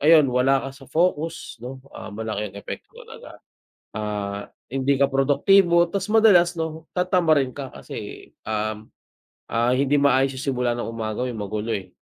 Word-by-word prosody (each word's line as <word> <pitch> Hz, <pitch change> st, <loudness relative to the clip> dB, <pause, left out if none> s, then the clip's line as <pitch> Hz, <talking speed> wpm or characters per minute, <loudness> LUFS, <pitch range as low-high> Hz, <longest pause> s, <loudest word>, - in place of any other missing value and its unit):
ayun 150 Hz, -3 st, +6 dB
wala 135 Hz, +2 st, +3 dB
ka -, -, -3 dB
sa 135 Hz, 0 st, -14 dB
focus 160 Hz, -3 st, -1 dB
'no? 130 Hz, +2 st, -8 dB
Ah, -, -, -8 dB
malaki 105 Hz, 0 st, -4 dB
'yung 100 Hz, -, -14 dB
epekto 100 Hz, -, -8 dB
talaga. -, -, -12 dB, 0.6 s
Ah, 105 Hz, -1 st, -4 dB, 0.2 s
hindi 135 Hz, +1 st, 0 dB
ka 140 Hz, -, +5 dB
produktibo 170 Hz, +6 st, +4 dB
tas 195 Hz, -1 st, -2 dB
madalas 195 Hz, -6 st, +6 dB
'no, 160 Hz, 0 st, -4 dB
tatamarin 170 Hz, -7 st, +2 dB
ka 140 Hz, -2 st, -6 dB
kasi, -, -, -9 dB, 0.2 s
um, 110 Hz, 0 st, -3 dB, 0.6 s
ah, 120 Hz, +2 st, +2 dB
hindi 135 Hz, +2 st, +1 dB
maayos 135 Hz, -1 st, +3 dB
'yung -, -, -5 dB
simula 125 Hz, -1 st, 0 dB
ng -, -, -3 dB
umaga 110 Hz, 0 st, -3 dB
mo 125 Hz, -, -1 dB
may 120 Hz, -, -6 dB
magulo, 105 Hz, +2 st, -3 dB
eh. 95 Hz, -2 st, -5 dB
135 Hz, 165 wpm, -23 LUFS, 110-160 Hz, 0.6 s, ayun